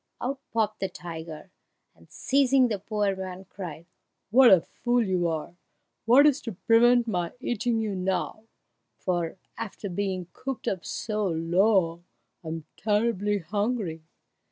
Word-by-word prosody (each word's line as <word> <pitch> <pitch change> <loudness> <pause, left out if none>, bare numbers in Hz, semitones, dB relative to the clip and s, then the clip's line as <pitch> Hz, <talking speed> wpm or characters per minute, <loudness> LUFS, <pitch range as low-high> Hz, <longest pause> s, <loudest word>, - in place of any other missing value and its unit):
Out 265 +2 -3
popped 215 -1 0
the 195 - -1
tiger, 160 0 -8 0.4
and, - - -22
seizing 270 -2 +3
the 210 -3 -2
poor 205 -1 -1
man, 190 0 -7
cried, 170 -5 -8 0.5
"What 255 +2 +8
a 190 - +8
fool 240 +6 0
you 180 -3 +1
are! 165 +1 -4 0.5
What 255 +6 +7
is 290 -2 +4
to 225 - -5
prevent 235 +5 +4
my 180 -5 -1
eating 240 -1 -1
you 220 -2 -1
now, 190 +4 -2 0.5
for 175 -1 -2 0.2
after 205 -1 -5
being 185 0 -2
cooped 270 -2 -5
up 185 -3 -1
so 215 -2 -2
long 175 +1 +2 0.4
I - - -9
am 160 0 -4
just - - -25
terribly 210 -1 +1
hungry!" 200 -2 -2
200 Hz, 145 wpm, -27 LUFS, 175-230 Hz, 0.5 s, What